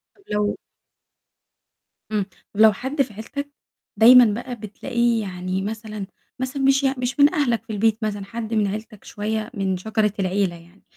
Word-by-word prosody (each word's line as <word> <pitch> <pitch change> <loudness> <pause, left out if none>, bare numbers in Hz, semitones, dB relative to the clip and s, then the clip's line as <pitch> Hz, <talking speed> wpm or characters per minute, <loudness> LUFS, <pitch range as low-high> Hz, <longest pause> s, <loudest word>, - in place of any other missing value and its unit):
طب 395 - -25
لو 210 0 0 1.5
إمم، 205 -3 0 0.3
ولو 220 +1 +7
حد 270 +7 -2
في 240 -5 -2
عيلتك، 280 +7 -6 0.5
دايمًا 245 +2 +9 0.2
بقى 250 -2 -6
بتلاقيه 235 +2 -1
يعني 185 -1 -3
مثلًا 215 0 -5 0.3
مثلًا 260 +2 -3
مش 270 +1 +4
يع 270 0 +2
مش 250 +3 -3
من 285 +1 +6
أهلك 240 -7 +1
في 220 - -6
البيت 220 +1 +2
مثلًا، 205 -2 -2
حد 225 +1 -5
من 210 -2 +2
عيلتك 215 +1 -6
شوية 215 +2 -3
من 195 -3 -1
شجرة 215 +1 0
العيلة 190 -1 0
يعني، 170 +3 -18
220 Hz, 160 wpm, -23 LUFS, 200-245 Hz, 1.5 s, دايمًا